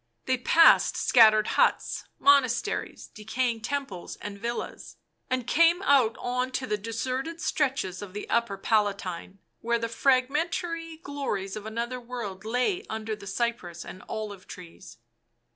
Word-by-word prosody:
They 260 -1 +1
passed 330 +6 +5
scattered 215 -3 +6
huts, - - +1
monasteries, 280 - +2
decaying 225 +2 -2
temples 240 -7 -4
and 200 -1 -8
villas, 235 +2 -5 0.3
and 255 -2 -1
came 335 +7 +4
out 265 - +4
on 250 +1 -2
to 260 - -2
the 210 - 0
deserted 255 +9 -4
stretches 270 - -1
of 200 -2 -8
the 210 - -6
upper 235 -4 0
Palatine, 195 -3 -1 0.2
where 235 +1 0
the 230 0 -2
fragmentary 320 +7 0
glories 275 -11 -4
of 215 0 -7
another 235 +3 -3
world 225 -5 -6
lay 250 - 0
under 220 0 -3
the 200 -1 -12
cypress 190 -6 -3
and 185 - -9
olive 205 -3 -6
trees. 175 0 -12
235 Hz, 135 wpm, -27 LUFS, 210-270 Hz, 0.3 s, scattered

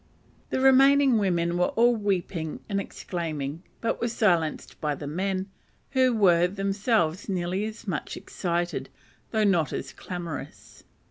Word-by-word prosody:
The - - -1
remaining 270 -1 +6
women 175 -3 +1
were 180 - +4
all 240 +1 +5
weeping 180 -6 -2
and 200 -2 -1
exclaiming, 160 -6 -4 0.2
but 230 - -1
were 235 - +1
silenced 175 -9 0
by 150 -1 0
the 145 - -7
men, 185 +5 -1 0.5
who 260 -2 +4
were 180 -6 +4
themselves 195 -1 0
nearly 185 +2 -1
as 220 0 -8
much 175 -5 -3
excited, 175 -1 -2 0.4
though 220 -1 +1
not 175 -8 +3
so - - -2 0.2
clamorous. 175 -4 -7
190 Hz, 135 wpm, -26 LUFS, 170-220 Hz, 0.5 s, remaining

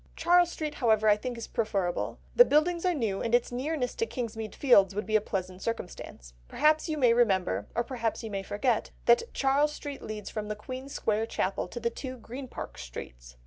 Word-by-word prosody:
Charles 350 0 +4
Street, 305 -3 -4
however, 220 -5 +2
I 210 - +7
think 245 +3 -5
is 230 - -5
preferable. 195 -5 -1 0.2
The - - +10
buildings 340 -1 +2
are 360 - +3
new, 215 -8 -1
and 230 +1 +2
its 245 - +1
nearness 255 +1 -2
to 455 - 0
Kingsmead 225 - -5
Fields 200 -8 +5
would 210 - -2
be 215 - -1
a 215 - +5
pleasant 185 -2 -4
circumstance. 180 - -6
Perhaps 310 +2 +2
you 310 - -1
may 245 -5 +5
remember, 190 - +2
or 235 - +1
perhaps 230 -2 -3
you 220 - -5
may 195 -1 -2
forget, 215 +4 0 0.2
that 240 - +4
Charles 285 +2 +2
Street 285 -2 -7
leads 215 -2 -6
from 215 -1 -4
the 210 - -3
Queen's 255 +5 -7
Square 220 -2 0
Chapel 190 -4 -1
to 240 - -7
the 235 0 -1
two 255 +2 -6
Green 250 +3 -8
Park - - -8
Streets. - - -9
230 Hz, 205 wpm, -29 LUFS, 210-270 Hz, 0.2 s, The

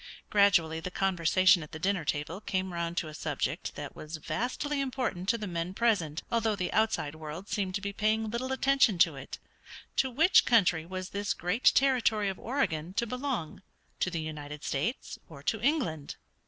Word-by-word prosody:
Gradually 170 -6 +4
the 170 - -5
conversation 185 -1 +3
at 150 - -10
the - - -4
dinner 185 +1 0
table 150 +6 -3
came 190 -3 -2
round 170 0 -3
to 165 - 0
a 155 - -8
subject 150 -1 -3
that 145 -1 -7
was 155 +1 -7
vastly 265 - -2
important 250 -9 -2
to 235 - +3
the 215 - -5
men 175 0 -3
present, 195 -10 +1
although 225 -2 +1
the 180 -2 -3
outside 220 -9 +1
world 155 +4 -8
seemed 190 -3 -2
to 200 - -2
be 200 0 -4
paying 220 +1 +1
little 240 +4 -3
attention 265 -6 +3
to 165 -3 +4
it 135 0 -8 0.6
to 265 - +3
which 320 +9 +5
country 180 -9 +3
was 185 +1 -5
this 200 0 -2
great 180 +8 -2
territory 235 -6 +3
of 190 - -5
Oregon 180 - -1
to 235 - +1
belong, 250 - -3 0.4
to - - +1
the 170 -3 -3
United 150 -1 -7
States 150 - -2
or 140 -4 -11
to 220 +7 -1
England? 215 - 0
185 Hz, 180 wpm, -30 LUFS, 160-225 Hz, 0.6 s, which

